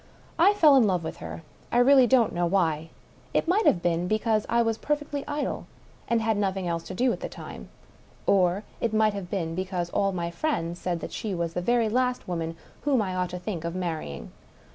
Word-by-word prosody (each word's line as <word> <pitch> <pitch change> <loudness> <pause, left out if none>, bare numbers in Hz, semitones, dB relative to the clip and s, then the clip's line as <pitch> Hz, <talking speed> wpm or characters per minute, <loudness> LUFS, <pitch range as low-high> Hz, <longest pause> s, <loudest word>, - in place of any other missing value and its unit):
I 385 +5 +6
fell 305 -8 +6
in 235 -5 +5
love 180 -3 0
with 160 - -5
her 80 0 -8
— - - -29
I - - +2
really 260 +1 +6
don't 245 -3 +3
know 175 0 +1
why. 165 -4 +1 0.5
It - - +2
might 400 +6 +3
have 175 - +3
been 175 0 +1
because 215 +1 +1
I 235 0 +3
was 225 -1 -1
per 295 - +1
fectly 290 -1 -5
idle, 290 0 -3 0.4
and 230 -1 +1
had 220 -1 +1
nothing 190 -2 -1
else 170 -1 -1
to 185 - -7
do 250 +4 +2
at - - -6
the - - -5
time. - - -9 0.6
Or 190 +1 +3 0.2
it 225 -2 -1
might 215 -1 +3
have 195 -3 -6
been 170 -5 -2
because 180 -1 -3
all 195 0 +1
my 170 -2 -3
friends 170 - -2
said 175 -2 -2
she 210 -4 -3
was 170 -1 -2
the 180 - -2
very 235 +3 +2
last 250 +2 0
woman 165 -2 -3 0.2
whom 280 -4 +2
I 190 -4 -1
ought 180 -1 -1
to 180 - -5
think 180 -2 -5
of 170 +1 -3
marrying. 160 - -4
195 Hz, 220 wpm, -26 LUFS, 175-235 Hz, 0.6 s, I